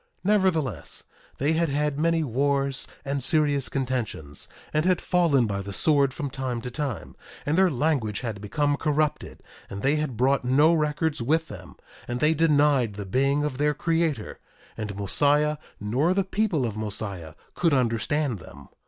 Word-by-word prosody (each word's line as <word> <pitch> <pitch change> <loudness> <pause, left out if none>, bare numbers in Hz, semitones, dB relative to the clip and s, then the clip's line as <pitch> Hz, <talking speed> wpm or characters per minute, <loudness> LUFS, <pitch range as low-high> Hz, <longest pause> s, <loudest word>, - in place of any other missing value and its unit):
Nevertheless, 180 - 0 0.3
they 145 +4 +1
had 165 0 +1
had 145 0 -1
many 165 0 +2
wars 140 +1 0 0.2
and 140 0 -2
serious 145 0 +3
contentions, 120 - -2 0.3
and 155 - +2
had 180 -1 +2
fallen 170 -9 +2
by 100 -2 -2
the 100 0 -7
sword 140 +2 +3
from 135 +2 -5
time 130 -3 -3
to 125 - -6
time; 135 -4 -4 0.3
and 150 - +1
their 190 +1 +4
language 135 -7 0
had 110 -5 -5
become 145 +7 0
corrupted; 150 0 -1 0.3
and 100 - -7
they 140 +3 +3
had 150 -6 -3
brought 135 +3 +2
no 145 +6 +4
records 155 -2 0
with 160 +7 +1
them; - - -10 0.3
and 120 0 -3
they 155 +3 +3
denied 145 -8 +3
the 100 -1 -6
being 135 +8 +1
of 145 -3 -3
their 150 0 +2
Creator; 160 -7 -1 0.4
and 105 -2 -5
Mosiah, 145 +9 +2 0.2
nor 130 - +1
the 195 - +2
people 190 - 0
of 110 -3 -3
Mosiah, 100 -6 -5 0.2
could 170 -2 +1
understand 125 +1 0
them. - - -13
140 Hz, 160 wpm, -25 LUFS, 120-155 Hz, 0.4 s, their